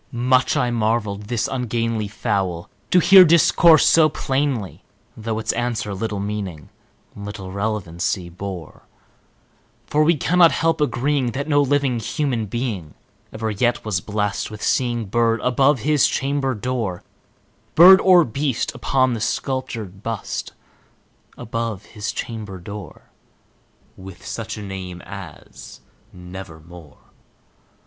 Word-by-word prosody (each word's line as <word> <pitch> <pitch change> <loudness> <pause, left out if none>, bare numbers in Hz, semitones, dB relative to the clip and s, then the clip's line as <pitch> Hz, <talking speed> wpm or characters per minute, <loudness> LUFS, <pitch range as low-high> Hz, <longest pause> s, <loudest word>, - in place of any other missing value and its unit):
Much 125 +1 +2
I 125 -1 +1
marvelled 110 -3 -1
this 115 0 -1
ungainly 115 -4 -2
fowl 100 -5 -2 0.2
to - - +3
hear 190 +1 +8
discourse 170 -1 +5
so 160 -2 +5
plainly, 130 - -2 0.3
Though 110 0 -4
its 110 0 -1
answer 115 -3 -2
little 105 +1 -3
meaning 100 -7 -5 0.5
little 100 -2 -7
relevancy 95 -3 -2
bore; 90 -1 -8 1.0
For 150 +1 +2
we 165 +1 +3
cannot 175 +3 +4
help 165 -1 0
agreeing 140 -3 0
that 140 +4 -3
no 145 -2 +3
living 140 -3 +1
human 120 -2 -2
being 100 - -4 0.4
Ever 110 0 -3
yet 120 +4 0
was 100 -4 -1
blessed 105 0 -2
with 105 -1 -9
seeing 120 -3 0
bird 115 +2 +1
above 135 +1 +2
his 150 0 +3
chamber 135 -1 -1
door 110 -5 -3 0.7
Bird 185 +3 +9
or 180 -3 +6
beast 135 +2 -2
upon 130 +1 +1
the 115 - -4
sculptured 115 -7 -3
bust 115 -2 -5 0.8
above 115 -3 -4
his 105 -2 -5
chamber 105 -5 -6
door, 100 -1 -10 0.8
With 95 -1 -12
such 110 -1 -5
name 95 -3 -7
as - - -11 0.3
"Nevermore." 90 - -11
115 Hz, 120 wpm, -21 LUFS, 100-130 Hz, 1.0 s, Bird